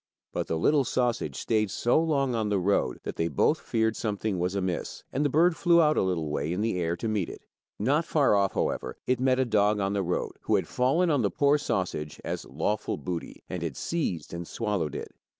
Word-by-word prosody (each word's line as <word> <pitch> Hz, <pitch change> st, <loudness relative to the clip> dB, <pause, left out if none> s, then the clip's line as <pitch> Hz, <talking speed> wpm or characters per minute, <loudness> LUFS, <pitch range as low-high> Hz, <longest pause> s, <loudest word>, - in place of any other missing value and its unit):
But -, -, -2 dB
the 80 Hz, -, -1 dB
little 145 Hz, -, +3 dB
sausage 120 Hz, -1 st, -1 dB
stayed 110 Hz, -2 st, 0 dB
so 120 Hz, +8 st, +2 dB
long 140 Hz, -5 st, +1 dB
on 110 Hz, -2 st, 0 dB
the 100 Hz, -, +2 dB
road 95 Hz, +2 st, +1 dB
that -, -, -5 dB
they 80 Hz, -, +1 dB
both 75 Hz, -, +2 dB
feared 110 Hz, -1 st, 0 dB
something 105 Hz, -3 st, -2 dB
was 90 Hz, +2 st, -1 dB
amiss, 95 Hz, -3 st, -3 dB
and 140 Hz, -, +1 dB
the 145 Hz, -, +2 dB
bird 165 Hz, +5 st, +4 dB
flew 170 Hz, -1 st, +4 dB
out 155 Hz, -2 st, +4 dB
a -, -, +2 dB
little 85 Hz, -5 st, -1 dB
way 75 Hz, +2 st, -1 dB
in 90 Hz, +3 st, -1 dB
the 110 Hz, -4 st, 0 dB
air 85 Hz, 0 st, 0 dB
to 100 Hz, -, -4 dB
meet 105 Hz, -5 st, -1 dB
it. -, -, -10 dB, 0.3 s
Not 140 Hz, +10 st, +2 dB
far 145 Hz, -7 st, +3 dB
off, 100 Hz, -1 st, +2 dB
however, -, -, -2 dB
it 125 Hz, -1 st, +1 dB
met 130 Hz, 0 st, +3 dB
a 130 Hz, -, +2 dB
dog 105 Hz, -2 st, +2 dB
on 100 Hz, 0 st, 0 dB
the 100 Hz, -, +1 dB
road 90 Hz, -1 st, -2 dB
who -, -, +1 dB
had -, -, 0 dB
fallen 160 Hz, +8 st, +2 dB
on 145 Hz, -4 st, +2 dB
the 100 Hz, -, +2 dB
poor 145 Hz, +5 st, +3 dB
sausage 75 Hz, -, -2 dB
as -, -, -4 dB
lawful 105 Hz, +10 st, -2 dB
booty, 90 Hz, -2 st, -6 dB
and 90 Hz, -, -4 dB
had 80 Hz, -6 st, -4 dB
seized 150 Hz, -, -2 dB
and 85 Hz, 0 st, -5 dB
swallowed 100 Hz, -, -2 dB
it. -, -, -6 dB
105 Hz, 225 wpm, -28 LUFS, 90-130 Hz, 0.3 s, bird